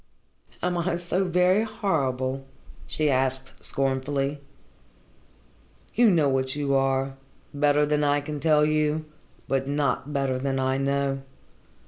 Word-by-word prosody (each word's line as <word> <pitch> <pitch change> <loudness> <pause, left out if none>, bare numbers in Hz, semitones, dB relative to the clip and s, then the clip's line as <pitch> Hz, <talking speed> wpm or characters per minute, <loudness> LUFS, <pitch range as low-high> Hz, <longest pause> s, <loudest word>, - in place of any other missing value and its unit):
"Am 180 0 0
I 170 0 0
so 175 +2 -1
very 180 +3 +3
horrible?" 135 - -1 0.4
she 155 - 0
asked 130 0 -1
scornfully. 135 +1 -1 1.5
"You 235 0 +5
know 165 -6 +3
what 130 0 0
you 145 -2 -1
are, 135 0 +1 0.4
better 145 +1 +3
than 150 0 +1
I 145 0 +3
can 145 +1 -5
tell 150 -1 +4
you, 155 0 +1 0.4
but 135 0 0
not 145 0 -1
better 135 -2 0
than 135 0 -1
I 130 0 +1
know. 140 0 0
145 Hz, 125 wpm, -26 LUFS, 135-155 Hz, 1.5 s, You